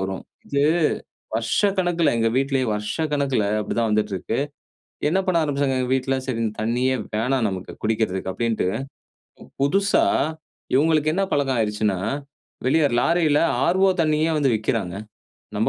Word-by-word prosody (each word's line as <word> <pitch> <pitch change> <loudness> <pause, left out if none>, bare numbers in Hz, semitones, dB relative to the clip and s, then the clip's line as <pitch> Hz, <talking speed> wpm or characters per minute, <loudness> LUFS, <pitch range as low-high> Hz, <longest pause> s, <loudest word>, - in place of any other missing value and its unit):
வரும் 95 0 -3 0.2
இது, 140 0 0 0.7
வருஷக்கணக்கில 175 - +1
எங்க 115 0 +2
வீட்டிலேயே 135 -1 +1
வருஷக்கணக்கில 135 +3 -1 0.2
அப்படிதான் 115 +2 -1
வந்துட்டு 105 -1 0
இருக்கு. 95 +5 -3 0.7
என்ன 185 +5 +2
பண்ண 185 -2 +2
ஆரம்பிச்சாங்க 140 -2 0
எங்க 125 -1 -1
வீட்ல 130 0 0
சரி 125 -4 -2
இந்த 110 - -1
தண்ணியே 125 +3 +1 0.2
வேணாம் 120 +2 +1
நமக்கு 95 -1 -6
குடிக்கிறதுக்கு 105 -4 0
அப்படின்ட்டு 115 -2 -1 1.0
புதுசா 200 - +3 0.7
இவங்களுக்கு 155 +1 +3
என்ன 195 +2 +1
பழக்கம் 135 -3 +1
ஆயிடுச்சுன்னா 105 -3 0 0.7
வெளியே 150 +3 +4
லாரியில 160 0 +3 0.3
ஆர்ஓ 190 +2 +4
தண்ணியே 155 +1 +1
வந்து 140 -3 +2
விக்கிறாங்க. 95 -4 -2 0.6
நம்ப - - +1
130 Hz, 125 wpm, -23 LUFS, 110-155 Hz, 1.0 s, வெளியே